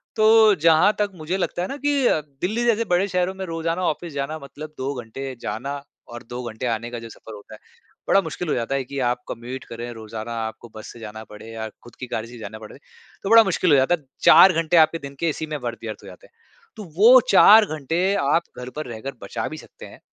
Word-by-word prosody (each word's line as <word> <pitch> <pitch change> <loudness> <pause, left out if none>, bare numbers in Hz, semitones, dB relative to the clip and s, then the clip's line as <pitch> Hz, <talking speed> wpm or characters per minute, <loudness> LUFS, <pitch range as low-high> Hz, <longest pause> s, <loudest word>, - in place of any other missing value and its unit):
तो 220 -1 +6
जहाँ 165 +5 +5
तक 205 -1 0
मुझे 175 +3 -3
लगता 175 - -2
है 180 - -2
ना 275 - -6
कि 285 -2 0
अ, - - +2 0.2
दिल्ली 215 +7 -1
जैसे 230 -1 +2
बड़े 180 +3 +2
शहरों 180 0 -1
में 190 0 -5
रोज़ाना 165 +1 -3
ऑफ़िस 155 +2 -3
जाना 140 +3 -3
मतलब 150 +2 -10
2 135 +2 -3
घंटे 130 +4 -7
जाना 125 +7 -4 0.3
और 120 0 -9
2 120 +1 -5
घंटे 110 +3 -6
आने 115 0 -2
का 120 - -5
जो 115 0 -10
सफ़र 110 - -12
होता 105 +1 -13
है, 110 - -12 0.5
बड़ा 195 - +4
मुश्किल 175 0 -6
हो - - +1
जाता 120 +3 -2
है 135 - -1
कि 140 +2 -6
आप 125 0 -3
कम्यूट 125 +3 -6
करें 120 +1 -6
रोज़ाना 110 +1 -7
आपको 115 +1 -11
बस 110 - -9
से 120 - -13
जाना 110 0 -8
पड़े 105 +2 -11
या 110 -1 -5
ख़ुद 120 +1 -18
की 125 - -6
गाड़ी 110 +1 -3
से 120 - -14
ही 120 - -10
जाना 110 0 -8
पड़े। 110 +3 -12 0.5
तो 195 - -3
बड़ा 230 0 +8
मुश्किल 185 -3 +1
हो - - +7
जाता 135 +6 +3
है। 160 - -19 0.2
4 190 - +8
घंटे 165 +1 +1
आपके 160 +1 +5
दिन 140 -1 -9
के 170 - +1
इसी 155 +1 -4
में 155 -1 -4
वर्थ 115 -2 -4
व्यर्थ 110 -2 -7
हो - - -12
जाते - - -14
हैं। - - -38 0.4
तो 215 - -8
वो 240 +6 +8
4 215 +1 +8
घंटे 155 0 -2
आप 145 +3 +2
घर 125 0 -7
पर 155 - -4
रहकर 120 +4 -6
बचा 110 +3 -4
भी 155 - -8
सकते - - -13
हैं - - -14
145 Hz, 245 wpm, -22 LUFS, 120-180 Hz, 0.5 s, बड़ा